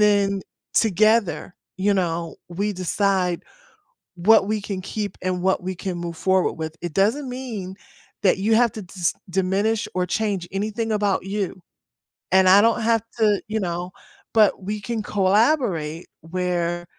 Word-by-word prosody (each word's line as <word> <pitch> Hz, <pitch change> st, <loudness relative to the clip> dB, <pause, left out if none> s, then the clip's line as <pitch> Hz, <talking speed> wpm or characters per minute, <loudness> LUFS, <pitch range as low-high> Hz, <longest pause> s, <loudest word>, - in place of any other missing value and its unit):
then 200 Hz, -2 st, +3 dB, 0.3 s
together, 215 Hz, -2 st, +2 dB, 0.2 s
you 200 Hz, +2 st, +2 dB
know, 170 Hz, -3 st, -1 dB
we 200 Hz, +4 st, -2 dB
decide 185 Hz, -1 st, 0 dB, 0.7 s
what 195 Hz, +3 st, +5 dB
we 215 Hz, 0 st, -1 dB
can 195 Hz, -2 st, -4 dB
keep 205 Hz, +2 st, -4 dB
and 180 Hz, -1 st, -1 dB
what 190 Hz, 0 st, +1 dB
we 185 Hz, +1 st, -3 dB
can 185 Hz, 0 st, -4 dB
move 170 Hz, -1 st, -5 dB
forward 190 Hz, +1 st, +2 dB
with. 160 Hz, 0 st, -5 dB
It 175 Hz, -3 st, -5 dB
doesn't 230 Hz, -, +1 dB
mean 230 Hz, -7 st, -6 dB, 0.5 s
that 190 Hz, -, +4 dB
you 215 Hz, +4 st, +2 dB
have 235 Hz, 0 st, +4 dB
to 215 Hz, -, -6 dB
dis 175 Hz, -2 st, -1 dB, 0.2 s
diminish 195 Hz, +4 st, 0 dB
or 180 Hz, 0 st, +1 dB
change 195 Hz, -1 st, -1 dB
anything 215 Hz, +3 st, -2 dB
about 205 Hz, -3 st, 0 dB
you, 195 Hz, -2 st, -3 dB, 0.7 s
and 190 Hz, 0 st, +5 dB
I 195 Hz, +2 st, +8 dB
don't 230 Hz, +1 st, +3 dB
have 225 Hz, -1 st, +2 dB, 0.2 s
to, 210 Hz, -3 st, +3 dB
you 220 Hz, +1 st, -1 dB
know, 175 Hz, -1 st, -3 dB, 0.4 s
but 210 Hz, -3 st, +4 dB
we 210 Hz, +3 st, -3 dB
can 225 Hz, +2 st, -3 dB
collaborate 195 Hz, -, +1 dB
where 175 Hz, 0 st, -2 dB
195 Hz, 150 wpm, -23 LUFS, 180-215 Hz, 0.7 s, I